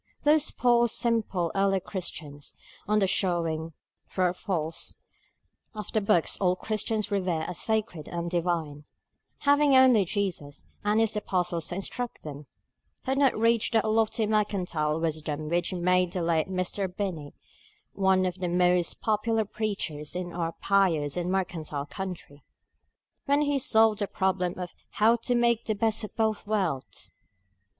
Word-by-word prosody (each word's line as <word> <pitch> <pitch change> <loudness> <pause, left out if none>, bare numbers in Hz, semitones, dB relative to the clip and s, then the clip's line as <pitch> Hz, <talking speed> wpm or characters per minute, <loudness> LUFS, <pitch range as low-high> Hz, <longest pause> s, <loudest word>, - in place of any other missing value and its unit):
Those 300 0 +4
poor 240 -1 +3
simple 215 -8 0
early 195 0 +2
Christians 160 -6 -6 0.3
(on 210 +1 +2
the 200 - +3
showing, 165 -4 0 0.4
true 185 - 0
or 180 - +2
false, 165 -4 -3 0.8
of 210 - -6
the 220 - +1
books 175 -4 +2
all 180 -1 +3
Christians 215 +1 -2
revere 180 -5 0
as 180 - -5
sacred 215 -8 -1
and 170 0 -4
divine), 165 -4 -2 0.6
having 285 -1 +4
only 255 -5 +6
Jesus 175 -8 -3 0.2
and 210 +1 +2
his 225 -1 +2
apostles 180 -5 -1
to 175 - -4
instruct 240 +5 -4
them, 145 -1 -8 0.6
had 265 +1 0
not 275 -5 +3
reached 230 +1 +2
that 220 -1 +2
lofty 220 0 +1
mercantile 180 -8 0
wisdom 155 -2 -2
which 175 +1 0
made 180 0 +1
the 180 -3 -1
late 165 0 +1
Mr. 185 +1 -1
Binney 180 -7 -4 0.6
one 190 -1 +2
of 180 0 -3
the 180 -1 -1
most 180 0 +2
popular 220 0 +1
preachers 185 -9 -3
in 180 -1 -4
our 165 -1 -2
pious 165 -9 +1
and 180 0 -2
mercantile 165 -6 -2
country, 165 -4 -7 0.8
when 285 +1 +3
he 290 -1 +1
solved 220 -3 +4
the 205 - -1
problem 185 -2 -1
of 180 -1 -6 0.2
How 225 +2 +4
to 245 +2 -1
Make 235 -1 +2
the 215 - -1
Best 220 +1 +1
of 215 - -7
Both 220 -2 0
Worlds. 185 -11 -2
190 Hz, 150 wpm, -27 LUFS, 170-220 Hz, 0.8 s, only